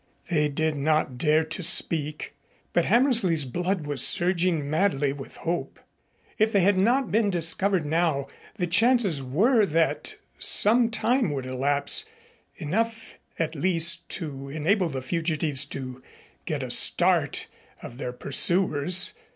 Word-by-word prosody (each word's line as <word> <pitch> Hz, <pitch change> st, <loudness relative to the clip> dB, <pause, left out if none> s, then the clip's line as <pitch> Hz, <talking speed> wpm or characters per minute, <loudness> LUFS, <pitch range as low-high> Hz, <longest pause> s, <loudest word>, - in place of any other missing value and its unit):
They 150 Hz, -3 st, +1 dB
did 155 Hz, +1 st, -2 dB
not 140 Hz, -3 st, -1 dB
dare 155 Hz, +2 st, +2 dB
to 160 Hz, +4 st, -6 dB
speak, 155 Hz, -4 st, +2 dB, 0.4 s
but 175 Hz, -, +1 dB
Hammersley's 225 Hz, -, +3 dB
blood 175 Hz, +5 st, -3 dB
was 145 Hz, -3 st, +3 dB
surging 175 Hz, -4 st, +2 dB
madly 150 Hz, -3 st, -1 dB
with 140 Hz, -2 st, -11 dB
hope. 170 Hz, +1 st, -5 dB, 0.6 s
If 215 Hz, +1 st, +2 dB
they 200 Hz, -, +2 dB
had 200 Hz, +2 st, +2 dB
not 235 Hz, +6 st, 0 dB
been 215 Hz, -1 st, +1 dB
discovered 175 Hz, 0 st, +1 dB
now, 155 Hz, -3 st, -1 dB, 0.3 s
the 185 Hz, -5 st, -3 dB
chances 200 Hz, -, +2 dB
were 210 Hz, -, +1 dB
that 165 Hz, -3 st, -1 dB, 0.2 s
some 230 Hz, +2 st, +5 dB
time 240 Hz, -1 st, 0 dB
would 135 Hz, -3 st, -5 dB
elapse, 140 Hz, +2 st, +1 dB, 0.5 s
enough 225 Hz, +8 st, -4 dB, 0.2 s
at 160 Hz, -1 st, -3 dB
least 170 Hz, +1 st, 0 dB
to 140 Hz, -5 st, -8 dB
enable 165 Hz, +5 st, -1 dB
the 135 Hz, -3 st, -6 dB
fugitives 155 Hz, -2 st, 0 dB
to 130 Hz, -2 st, -9 dB, 0.5 s
get -, -, -3 dB
a -, -, -4 dB
good -, -, +5 dB
start -, -, +2 dB, 0.4 s
of 120 Hz, -, -11 dB
their 125 Hz, -, -5 dB
pursuers. 170 Hz, +5 st, +1 dB
165 Hz, 135 wpm, -24 LUFS, 145-195 Hz, 0.6 s, some